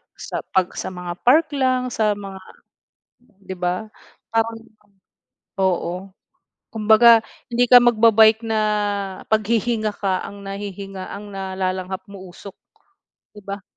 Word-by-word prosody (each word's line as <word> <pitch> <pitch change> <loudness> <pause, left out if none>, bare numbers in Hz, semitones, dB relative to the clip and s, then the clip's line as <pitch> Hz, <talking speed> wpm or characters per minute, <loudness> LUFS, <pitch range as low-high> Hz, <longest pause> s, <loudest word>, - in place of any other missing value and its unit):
sa - - -6 0.2
'pag 185 -1 +2
sa - - -4
mga 180 -1 -6 0.2
park 310 +4 +5
lang, 255 -2 0
sa 215 -2 +1
mga 195 -1 -9 0.8
di 200 -5 -11
ba, 180 +3 -2 0.5
parang, 225 0 0 1.0
oo, 185 0 -1 0.6
kumbaga 225 +1 +5 0.2
hindi 245 0 0
ka 245 - +11
magba-bike 225 -1 +5
na 220 -1 -1 0.7
paghihinga 220 0 0
ka, 190 -2 -2
ang 200 0 -11
nahihinga 195 -1 -7
ang 205 +1 -9
nalalanghap 190 -1 -4
mo, 200 - -10
usok, 190 +2 -11 0.8
di 210 - -13
ba? 200 0 -7
205 Hz, 120 wpm, -21 LUFS, 190-225 Hz, 1.0 s, ka